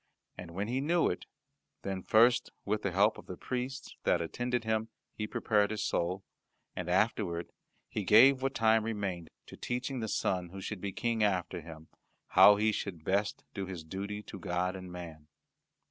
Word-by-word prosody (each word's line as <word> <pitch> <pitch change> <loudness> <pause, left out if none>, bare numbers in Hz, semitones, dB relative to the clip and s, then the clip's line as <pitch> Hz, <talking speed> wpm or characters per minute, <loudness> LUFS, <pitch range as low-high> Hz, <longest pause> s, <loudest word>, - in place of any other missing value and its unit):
And 85 -2 -9
when 100 +2 -2
he 130 +3 -1
knew 170 +4 +2
it, - - -6 0.6
then 95 -1 -3
first 120 +5 +4 0.2
with 105 +1 0
the 100 - 0
help 100 +4 +3
of - - -14
the 90 - -7
priests 130 +1 -4
that - - +3
attended 120 +8 -2
him 110 0 -1 0.2
he 105 - -4
prepared 105 -1 +1
his 105 -1 -2
soul, 90 0 -1 0.5
and 90 -1 -4
afterward 90 -3 0 0.4
he 105 - -3
gave 130 +7 +7
what 135 0 -1
time 110 -1 +4
remained 100 -7 -3 0.2
to - - -11
teaching 125 +2 -3
the 110 - -2
son 90 -4 -1
who 95 +2 -8
should 95 0 -5
be 100 - -3
King 115 +1 0
after 90 -3 0
him 80 0 -11 0.4
how 105 - +8
he 110 +2 +2
should 90 -6 -4
best 100 +3 0
do 100 -2 -4
his 90 -4 -6
duty 100 +5 -5
to 100 - -9
God 90 +2 -1
and 90 -1 -8
man. 80 -4 -9
100 Hz, 180 wpm, -31 LUFS, 90-110 Hz, 0.6 s, how